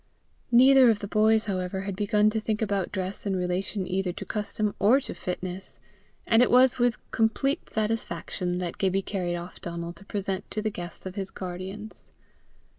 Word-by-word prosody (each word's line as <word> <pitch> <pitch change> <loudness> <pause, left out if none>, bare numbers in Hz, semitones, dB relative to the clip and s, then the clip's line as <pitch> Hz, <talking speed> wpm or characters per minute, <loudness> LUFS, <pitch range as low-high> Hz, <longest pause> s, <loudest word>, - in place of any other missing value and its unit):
Neither 260 +1 +7
of 220 - +3
the 205 - -6
boys, 220 +1 +3
however, 190 -1 -2
had 195 0 -4
begun 210 +1 +2
to 220 - 0
think 215 -1 -1
about 200 -3 -1
dress 190 +1 -3
in 195 - 0
relation 185 +2 -2
either 185 0 -1
to - - -7
custom 210 0 -2
or 235 +7 +5
to - - -4
fitness, 180 +1 -6 0.5
and 225 +1 +4
it 250 - +4
was 255 0 +5
with 240 -1 +2
complete 230 +5 0
satisfaction 185 -5 -2
that 180 -1 -4
Gibbie 195 0 +1
carried 180 -4 -2
off 175 +1 -8
Donal 170 0 -5
to 175 +3 -15
present 195 -1 -3
to 215 - -3
the 215 0 -1
guest 175 -2 -8
of 185 - -5
his 195 -1 -4
guardians. 190 +4 -7
200 Hz, 180 wpm, -27 LUFS, 185-220 Hz, 0.5 s, Neither